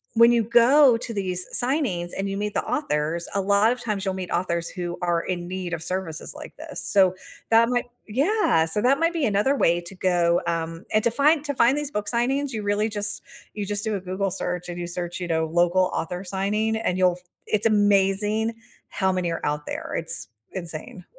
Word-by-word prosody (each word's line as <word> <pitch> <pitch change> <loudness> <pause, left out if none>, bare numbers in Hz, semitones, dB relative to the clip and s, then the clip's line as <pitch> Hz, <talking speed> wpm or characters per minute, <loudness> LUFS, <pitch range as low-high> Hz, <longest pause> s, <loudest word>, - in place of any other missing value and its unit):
when 235 +1 +7
you 235 -2 +3
go 240 +3 +6
to 235 +1 -5
these 185 -3 -1 0.2
signings 245 - -1
and 195 0 -2
you 195 - -3
meet 210 0 -2
the - - 0
authors, 170 - -1
a 200 - +2
lot 200 +3 +3
of 245 0 -3
times 205 -3 -2
you'll 190 - 0
meet 185 -1 -5
authors 170 -1 -1
who 175 -1 -4
are 175 -1 +1
in 175 -1 -4
need 180 -1 -4
of 165 - -3
services 180 -3 -3
like - - -10
this, - - -6
so 190 -2 +3 0.3
that 230 +1 +5
might 245 -1 0 0.2
Yeah, 270 - +2
so 165 +6 -1
that 265 +3 +3
might 330 +1 +2
be 325 -4 0
another 210 +6 +2
way 170 -9 +2
to 175 +3 -8
go, 175 -2 +2
um 165 +2 -3
and 215 - +3
to 235 - +4
find 295 +4 +3
to 285 - -1
find 240 +3 +4
these 295 -1 -2
book 210 -4 -3
signings, 265 +4 0
you 215 - -3
really 205 +2 +1
just 205 -1 -1 0.3
you 205 -1 -3
just 205 +1 0
do 220 -1 -1
a 195 - -2
Google 190 +2 -2
search, 180 0 -3
and 175 - -5
you 175 - -3
search, 175 0 -4
you 180 - -4
know, 160 -1 +1
"local 175 +3 +2
author 180 +3 -3
signing," 200 +4 -1
and 185 -4 -1
you'll 180 -1 +4
f - - -21 0.2
It's 215 +1 0
amazing 205 +1 +2 0.4
how 190 -2 0
many 180 -2 -1
are 165 - -4
out 150 0 -2
there, - - -5
it's 165 0 -2 0.3
insane. 170 0 -6
195 Hz, 215 wpm, -24 LUFS, 175-225 Hz, 0.4 s, when